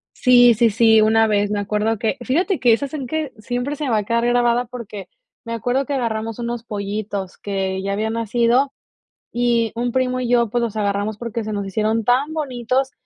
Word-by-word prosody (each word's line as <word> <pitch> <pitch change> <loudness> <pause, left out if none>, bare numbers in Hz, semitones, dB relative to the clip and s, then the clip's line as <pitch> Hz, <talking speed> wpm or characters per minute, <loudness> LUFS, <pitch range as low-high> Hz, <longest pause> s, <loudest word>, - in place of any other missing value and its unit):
Sí, 245 -2 +6
sí, 230 +2 +4
sí, 220 +1 +5
una 225 +1 +4
vez, 205 -1 +1
me 205 - 0
acuerdo 210 +2 -1
que, 220 +1 -1
fíjate 355 +7 0
que 240 -2 +5
esas 280 +5 -2
en 275 -4 -4
que 310 -1 -3
siempre 245 +6 -3
se 290 -2 -3
va 225 - +2
a 210 - 0
quedar 235 +3 0
grabada 240 0 +2
porque 225 -5 -8 0.4
me 230 - -4
acuerdo 245 +4 -1
que 285 - -3
agarramos 225 -3 -2
unos 235 -1 -4
pollitos 200 -3 -4
que 190 -1 -3
ya 200 0 -2
habían 220 +2 -1
nacido, 235 +4 +1 0.6
y 235 -2 +1
un 240 +1 -1
primo 255 0 0
y 250 - -2
yo, 235 -2 +3
pues, 240 +3 0
los 230 -3 -2
agarramos 205 0 -1
porque 230 -1 -4
se 215 0 -4
nos 200 -1 -3
hicieron 215 +3 0
tan 265 +6 +2
bonitos, 265 -3 -1
230 Hz, 200 wpm, -20 LUFS, 215-245 Hz, 0.6 s, Sí